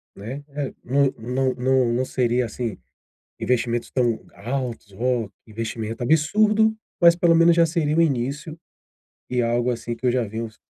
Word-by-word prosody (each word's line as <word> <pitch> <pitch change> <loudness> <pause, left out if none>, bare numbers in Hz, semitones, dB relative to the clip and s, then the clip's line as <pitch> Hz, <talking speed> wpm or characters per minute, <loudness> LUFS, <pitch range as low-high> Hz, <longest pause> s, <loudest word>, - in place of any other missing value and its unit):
né. 125 +8 -7 0.4
Não 135 +2 +2
não 125 +3 -1
não 130 -1 +2
não 130 +2 0
seria, 125 -1 +1
assim, 115 -2 -4 0.6
investimentos 120 -1 0
tão 120 -4 +1
altos, 120 -2 -4
oh, 120 0 -1 0.2
que 110 - -19
investimento 115 +1 -4
absurdo, 210 - +3 0.3
mas 170 0 +7
pelo 170 -1 +4
menos 165 0 +6
já 170 -1 +5
seria 155 -2 0
o - - +4
início, 145 +2 -1 0.7
e 125 -1 +1
algo, 120 +1 +1
assim, 120 0 -4
que 130 - -7
eu - - +4
já 125 -1 +1
venho 110 +2 -4
s 110 - -18
125 Hz, 165 wpm, -23 LUFS, 115-150 Hz, 0.7 s, mas